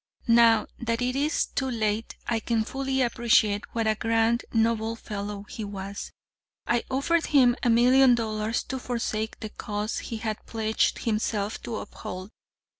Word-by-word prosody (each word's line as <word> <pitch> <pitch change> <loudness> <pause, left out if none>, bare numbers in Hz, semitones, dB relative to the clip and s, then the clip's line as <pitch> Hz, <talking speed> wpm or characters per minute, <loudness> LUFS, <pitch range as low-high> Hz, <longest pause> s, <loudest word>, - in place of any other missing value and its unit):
"'Now, 230 -1 +6
that 230 -1 -1
it 250 +1 0
is 295 +3 +1
too 265 -1 -2
late, 220 -2 -1
I 230 -2 0
can 225 0 0
fully 265 +2 -1
appreciate 230 -4 +2
what 225 -1 +1
a 220 - +3
grand, 225 +2 +1
noble 225 0 +1
fellow 205 -2 -5
he 225 - -6
was. 200 0 -6 0.5
I 240 -1 +1
offered 300 +6 +1
him 255 -5 +5
a 245 - +2
million 250 +2 +6
dollars 220 0 -1
to 265 - -5
forsake 225 -3 -3
the 215 - -5
cause 210 +1 -3
he 230 - -5
had 220 -1 -4
pledged 220 -1 0
himself 215 -1 -1
to 230 - -5
uphold. 185 -1 -7
225 Hz, 155 wpm, -26 LUFS, 215-240 Hz, 0.5 s, Now